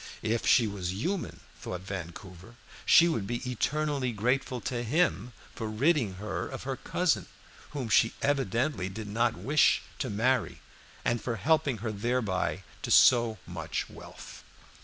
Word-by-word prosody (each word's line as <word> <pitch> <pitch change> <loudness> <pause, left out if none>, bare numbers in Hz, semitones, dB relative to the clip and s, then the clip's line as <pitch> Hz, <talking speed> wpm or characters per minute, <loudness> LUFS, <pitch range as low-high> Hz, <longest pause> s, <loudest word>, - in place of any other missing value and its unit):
If 115 +1 0
she 120 - +6
was 95 -4 -3
human, 170 - -3 0.2
thought 90 -1 -5
Vancouver, 95 +2 -8 0.3
she 170 - +7
would 115 -12 -1
be 120 +2 -3
eternally 140 +1 -1
grateful 125 +4 0
to 125 -1 -3
him 125 - +1 0.2
for 110 - -4
ridding 120 - +1
her 100 0 -4
of - - -7
her - - -3
cousin, - - 0 0.4
whom 140 -5 -4
she 115 +1 +3
evidently 130 -6 0
did 105 +2 -7
not 115 +1 0
wish 135 +11 +3 0.2
to - - -2
marry, 120 +3 0 0.5
and 120 -2 +1
for 120 - -2
helping 145 +3 +1
her 110 - -1
thereby 105 -4 -1 0.2
to - - -4
so 120 -3 +6
much 80 -2 -4
wealth. - - -11
115 Hz, 145 wpm, -29 LUFS, 100-130 Hz, 0.5 s, she